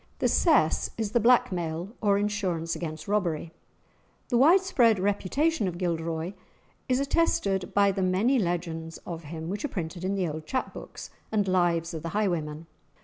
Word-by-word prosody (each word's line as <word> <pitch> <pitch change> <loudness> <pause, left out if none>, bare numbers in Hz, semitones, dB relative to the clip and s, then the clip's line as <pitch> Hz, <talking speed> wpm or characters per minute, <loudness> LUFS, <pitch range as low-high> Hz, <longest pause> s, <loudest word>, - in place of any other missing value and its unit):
The - - +1
"cess" 305 - +3
is 220 -3 -2
the 240 - +3
blackmail, 180 -7 +2
or 200 -2 +3
insurance 190 -6 -1
against 155 -1 -6
robbery. 175 -6 -1 0.8
The 240 - +2
widespread 285 - +5
reputation 205 - 0
of 175 -2 -4
Gilderoy 165 0 -2 0.6
is 255 0 +2
attested 205 - +1
by 200 -1 +5
the 195 0 -2
many 195 +8 +2
legends 165 -3 -3
of 165 -2 -6
him 160 +2 -6
which 200 +4 -4
are - - 0
printed 175 - -5
in 190 +2 0
the 185 -3 0
old 155 0 -6
chap 260 -1 -2
books - - -9 0.2
and 210 -3 +1
"Lives 175 -2 +1
of 160 - -5
the 165 - -4
Highwaymen." 165 -6 -1
185 Hz, 160 wpm, -27 LUFS, 165-210 Hz, 0.8 s, widespread